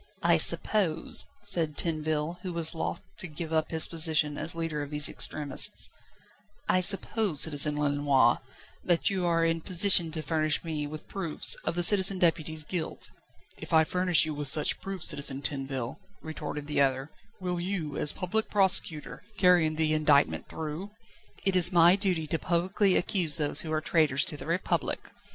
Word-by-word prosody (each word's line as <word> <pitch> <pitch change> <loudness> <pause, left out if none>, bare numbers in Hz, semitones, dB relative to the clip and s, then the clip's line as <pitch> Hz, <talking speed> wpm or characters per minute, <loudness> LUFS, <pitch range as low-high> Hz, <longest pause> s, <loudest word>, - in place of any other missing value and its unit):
"I - - +4
suppose," 170 -7 +2 0.2
said 165 -7 -2
Tinville, 155 0 -2
who 180 -2 -6
was 165 -1 -1
loth 165 +1 -5 0.2
to 180 - -5
give 160 +1 -8
up 160 -1 -1
his 160 -1 +3
position 155 -2 +2
as 160 +3 -4
leader 165 -3 -4
of 145 - -7
these 150 0 0
extremists 145 -3 +1 0.8
"I 185 - +2
suppose, 195 -3 0
Citizen 150 -1 +3
Lenoir, 145 -4 +1 0.4
that 175 +2 +1
you 185 -2 -2
are 165 -1 +1
in 165 0 -1
position 180 -1 +5
to 160 -1 -4
furnish 155 +1 -1
me 155 -3 -4
with 155 +1 -10
proofs 170 -6 -1
of - - -3
the 175 - -1
Citizen 195 +1 +6
Deputy's 160 -3 -1
guilt?" 165 +1 -4 0.5
"If - - -9
I 160 0 +5
furnish 180 0 +3
you 155 - -5
with 145 -1 -3
such 150 +2 +1
proofs, 195 -3 -2
Citizen 140 -2 -2
Tinville," 135 -4 -4 0.2
retorted 155 -2 -7
the 145 -1 -1
other, 135 +1 -1 0.3
"will 180 -2 -4
you, 175 -5 -5
as 150 - 0
Public 215 +4 -3
Prosecutor, 190 -6 0 0.2
carry 180 -4 +3
the 155 0 -1
indictment 150 -2 +1
through?" 160 +5 -7 0.6
"It 195 -1 0
is 180 -1 +8
my 175 0 +5
duty 185 -5 -1
to 160 +1 -3
publicly 185 +3 0
accuse 175 -6 0
those 150 -2 +2
who 160 - -7
are 155 0 -1
traitors 150 -5 +1
to 155 - -3
the - - -9
Republic." 170 +3 -3
160 Hz, 170 wpm, -27 LUFS, 150-180 Hz, 0.8 s, is